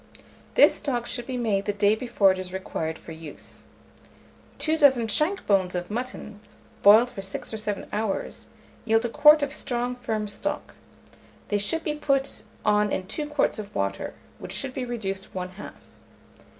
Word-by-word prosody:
This -, -, +7 dB
stock 245 Hz, -4 st, -2 dB
should 240 Hz, 0 st, -5 dB
be 255 Hz, -1 st, -3 dB
made 205 Hz, -5 st, 0 dB
the 205 Hz, -, 0 dB
day 205 Hz, +1 st, +3 dB
before 220 Hz, -4 st, +3 dB
it 185 Hz, -, -3 dB
is 185 Hz, -1 st, -6 dB
required 160 Hz, -4 st, -4 dB
for -, -, -12 dB
use. 160 Hz, -2 st, -10 dB, 0.9 s
Two 315 Hz, 0 st, +1 dB
dozen 265 Hz, -7 st, +5 dB
shank 305 Hz, -, +1 dB
bones 190 Hz, -3 st, +2 dB
of 175 Hz, +2 st, -3 dB
mutton, 230 Hz, -3 st, -5 dB, 0.4 s
boiled 220 Hz, +5 st, +7 dB
for 195 Hz, -, -6 dB
6 195 Hz, +3 st, -5 dB
or -, -, -2 dB
7 210 Hz, -2 st, -3 dB
hours, 210 Hz, -1 st, -3 dB, 0.4 s
yield 225 Hz, +1 st, +2 dB
a -, -, 0 dB
quart 300 Hz, +4 st, +6 dB
of 285 Hz, 0 st, -1 dB
strong 245 Hz, -3 st, -2 dB
firm 220 Hz, -4 st, -2 dB
stock. 205 Hz, -, -4 dB, 0.8 s
They 205 Hz, -, +1 dB
should 320 Hz, +11 st, -1 dB
be 305 Hz, -, -1 dB
put 275 Hz, -2 st, 0 dB, 0.2 s
on 210 Hz, -1 st, +3 dB
in 185 Hz, -, -2 dB
2 295 Hz, +10 st, -4 dB
quarts 295 Hz, -6 st, +1 dB
of 205 Hz, -1 st, -8 dB
water, 100 Hz, 0 st, -2 dB, 0.2 s
which -, -, -6 dB
should 270 Hz, -2 st, -2 dB
be 260 Hz, -1 st, -3 dB
reduced 195 Hz, -7 st, -4 dB
one 180 Hz, 0 st, -3 dB
half. 190 Hz, +3 st, -10 dB
215 Hz, 175 wpm, -26 LUFS, 195-255 Hz, 0.9 s, This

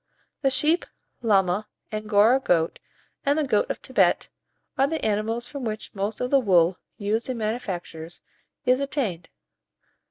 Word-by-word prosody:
The 270 Hz, -, +3 dB
sheep, 305 Hz, +6 st, +2 dB, 0.3 s
llama, 200 Hz, -2 st, +2 dB, 0.2 s
Angora 215 Hz, +3 st, +4 dB
goat, 170 Hz, -9 st, +1 dB, 0.4 s
and 285 Hz, +2 st, +2 dB
the 310 Hz, -, +2 dB
goat 295 Hz, -, +1 dB
of -, -, -2 dB
Thibet, -, -, +2 dB, 0.5 s
are 270 Hz, -, +3 dB
the 320 Hz, +2 st, -2 dB
animals 220 Hz, +3 st, 0 dB
from 280 Hz, +1 st, -7 dB
which 215 Hz, -2 st, -4 dB
most 205 Hz, +2 st, -3 dB
of 250 Hz, -, -2 dB
the 275 Hz, -, +6 dB
wool 180 Hz, -6 st, +3 dB, 0.2 s
used 220 Hz, +4 st, -1 dB
in 255 Hz, -, -2 dB
manufactures 185 Hz, -7 st, -4 dB, 0.4 s
is 255 Hz, +1 st, +4 dB
obtained. 265 Hz, -, -2 dB
220 Hz, 145 wpm, -25 LUFS, 200-265 Hz, 0.5 s, the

